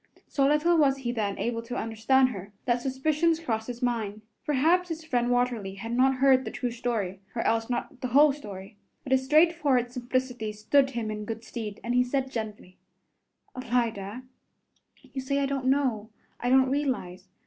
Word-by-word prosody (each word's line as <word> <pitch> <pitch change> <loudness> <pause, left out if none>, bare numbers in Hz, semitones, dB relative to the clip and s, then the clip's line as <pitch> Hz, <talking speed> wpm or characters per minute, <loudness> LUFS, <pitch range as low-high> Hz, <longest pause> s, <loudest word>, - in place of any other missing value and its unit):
So 275 -1 +2
little 300 +4 +3
was 275 -2 +4
he 250 -3 -3
then 210 -4 -2
able 230 -1 -2
to 245 +2 -6
understand 230 +4 +2
her, 200 -3 -8
that 240 -1 +1
suspicions 305 +5 +1
crossed 225 -8 -2
his 245 0 -6
mind. 220 -4 -2 0.2
Perhaps 330 +6 +3
his 325 -1 -5
friend 245 -5 0
Watterly 245 -6 0
had 225 +4 -6
not 260 +2 +3
heard 260 0 +4
the - - -4
true 245 -2 -3
story 225 -6 -2 0.2
or 230 - -1
else 225 +1 +1
not 250 +2 -4
the 255 - -1
whole 285 +4 +5
story. 205 -6 -10 0.3
But 265 - -7
his 265 0 +3
straightforward 295 -4 +3
simplicity 245 -3 -2
stood 265 +6 +2
him 235 -4 -3
in 210 0 -5
good 225 +1 -6
stead, 220 -3 -6
and 240 - -1
he 250 0 +4
said 260 +1 -2
gently, 215 -5 -6 0.8
"Alida, 235 -3 -2 0.9
you 270 - -3
say 275 +2 -1
I 280 - +2
don't 275 -1 -2
know, 255 -6 +1 0.3
I 245 - -1
don't 260 0 +4
realize. 250 -10 -2
245 Hz, 180 wpm, -27 LUFS, 225-270 Hz, 0.9 s, whole